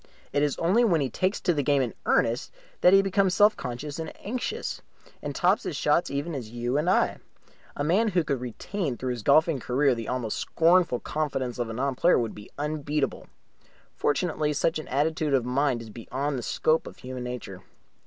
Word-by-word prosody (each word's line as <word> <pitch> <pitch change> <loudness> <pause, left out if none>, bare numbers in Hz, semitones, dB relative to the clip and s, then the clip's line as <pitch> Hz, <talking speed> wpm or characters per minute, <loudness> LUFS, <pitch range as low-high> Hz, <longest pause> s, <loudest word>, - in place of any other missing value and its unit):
It 145 - +2
is 145 -2 +1
only 190 +9 +3
when 180 -9 +3
he 135 -4 -1
takes 185 - 0
to 175 - +2
the 145 - 0
game 140 -1 +2
in 120 - -3
earnest 115 +2 +1 0.3
that 180 - +7
he 195 0 +6
becomes 195 -1 +2
self 210 +1 +5
conscious 140 +4 -5
and 160 - -4
anxious, 255 - -4 0.4
and - - -5
tops - - +3
his - - -4
shots 170 - +2
even 145 +4 -3
as 125 -6 -5
you 120 +2 -2
and 150 +4 +1
I. - - +2 0.6
A 145 - -2
man 190 +9 +3
who 180 -5 +2
could 140 -5 -2
retain 130 - -4
through 130 -1 -2
his 120 -2 -4
golfing 155 +5 +4
career 130 +3 +2
the 115 -2 -5
almost 125 -4 -2
scornful 165 -6 +3
confidence 135 -5 -2
of 120 - -1
the 115 - -5
non 135 +4 -1
player 175 +8 +4
would 115 -3 -1
be 105 - -11
unbeatable. 150 0 -2 0.7
Fortunately 150 -1 0
such 155 +2 0
an 155 - -8
attitude 150 +1 +1
of 125 -3 +1
mind 130 -1 0
is 110 - -11
beyond 135 +6 -3
the 125 - -3
scope 155 +6 +1
of - - -10
human 125 -1 -7
nature. 125 -7 -6
145 Hz, 200 wpm, -27 LUFS, 125-165 Hz, 0.7 s, that